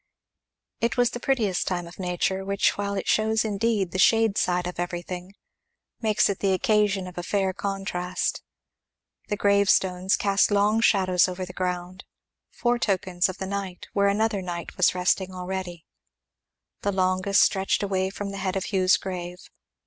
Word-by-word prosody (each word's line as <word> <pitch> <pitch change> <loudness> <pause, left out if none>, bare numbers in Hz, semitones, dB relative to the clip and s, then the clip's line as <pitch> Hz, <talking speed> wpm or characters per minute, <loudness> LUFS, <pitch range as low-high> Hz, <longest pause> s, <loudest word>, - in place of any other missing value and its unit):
It 230 +1 0
was 245 0 +3
that 240 - -5
prettiest 225 -9 0
time 175 -2 -2
of 170 +3 -13
nature 185 +1 -1
which 200 +1 +1
while 200 0 -2
it 195 - -4
shows 220 0 +2
indeed 205 -3 0
the 185 - -3
shade 225 0 +4
side 180 -2 +1
of 180 -1 -6
everything, 175 +2 -5 0.7
makes 215 -2 +3
it 200 - -2
the 195 -1 +1
occasion 205 -2 +1
of 180 -1 -8
a - - -2
fair 190 +1 0
contrast 185 -2 -3 0.9
The 205 - -2
grave 200 0 +3
stones 185 0 +2
cast 200 -1 +2
long 210 +2 +2
shadows 185 -5 +3
over 185 0 -4
the 180 - -10
ground, 180 0 -4 0.5
foretokens 195 -7 0
of 185 - -7
night 190 -2 -5
where 200 0 +3
another 210 0 +1
night 175 -2 -6
was 185 - +3
resting 185 +1 0
already; 180 -2 -5 1.0
the 200 - 0
longest 185 +1 +2
stretched 195 +1 +1
away 190 -1 0
from 200 0 -5
the 200 - -6
head 190 0 -2
of 195 +2 -3
Hugh's 185 -1 +4
grave. 180 -1 -7
190 Hz, 160 wpm, -25 LUFS, 180-200 Hz, 1.0 s, shade